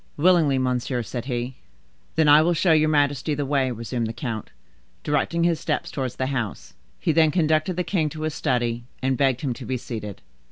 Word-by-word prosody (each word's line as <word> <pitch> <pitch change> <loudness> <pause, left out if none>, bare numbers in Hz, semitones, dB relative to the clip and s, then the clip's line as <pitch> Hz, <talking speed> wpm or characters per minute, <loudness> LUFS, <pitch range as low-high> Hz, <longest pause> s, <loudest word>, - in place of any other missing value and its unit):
"Willingly, 160 -4 +4
monsieur," 125 -1 -1
said 120 +2 -5
he. 125 -1 -3 0.6
"Then 160 -1 +3
I 150 +1 +8
will 170 +2 +2
show 165 +1 +3
your 155 -1 +4
majesty 145 0 +1
the 145 0 -2
way," 135 -2 +1
resumed 115 0 -3
the 110 - -4
count, 115 -4 -5 0.5
directing 165 +3 0
his 170 -2 +2
steps 155 -1 -2
towards 130 -3 -3
the 130 - -1
house. 115 -6 -4 0.3
He 165 - +1
then 160 0 +4
conducted 155 +1 +1
the 180 - 0
king 165 -5 0
to 155 0 -7
his 155 -1 -1
study, 120 -3 -1 0.2
and 130 0 +2
begged 135 -2 +1
him 135 -4 -1
to - - -9
be 130 - -2
seated. 110 -4 -7
140 Hz, 200 wpm, -24 LUFS, 125-155 Hz, 0.6 s, I